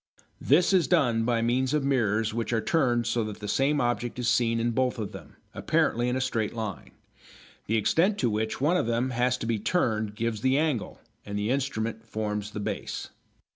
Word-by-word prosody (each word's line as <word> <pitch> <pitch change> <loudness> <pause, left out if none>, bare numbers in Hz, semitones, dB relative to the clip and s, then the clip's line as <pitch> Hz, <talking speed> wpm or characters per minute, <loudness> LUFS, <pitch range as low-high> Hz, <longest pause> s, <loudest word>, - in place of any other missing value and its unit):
This 180 +2 +4
is 185 -3 +4
done 120 -10 +2
by 115 -1 +1
means 130 +4 +1
of 150 - +1
mirrors 110 -5 +1
which 115 +1 -2
are 115 - +2
turned 120 -4 +1
so 115 +1 0
that 105 -1 -7
the 105 - -6
same 140 +7 +2
object 120 -1 -1
is 125 -1 -2
seen 115 -1 +2
in 120 +1 0
both 125 +1 0
of 110 -3 -4
them, - - -11 0.2
apparently 120 +2 +1
in 125 - 0
a - - 0
straight 115 -4 -1
line. 110 -6 -5 0.8
The 115 - +2
extent 165 - +2
to 125 - +1
which 110 +1 -2
one 155 +7 +2
of 145 - 0
them 120 +2 0
has 125 +1 +1
to - - -5
be 115 -2 0
turned 110 - 0
gives 115 -1 -2
the 130 +2 +2
angle, 150 -7 -1 0.2
and 100 0 -5
the 105 +3 -1
instrument 115 -4 -2
forms 105 -1 -3
the 105 - -6
base. 105 - -4
115 Hz, 205 wpm, -27 LUFS, 110-130 Hz, 0.8 s, This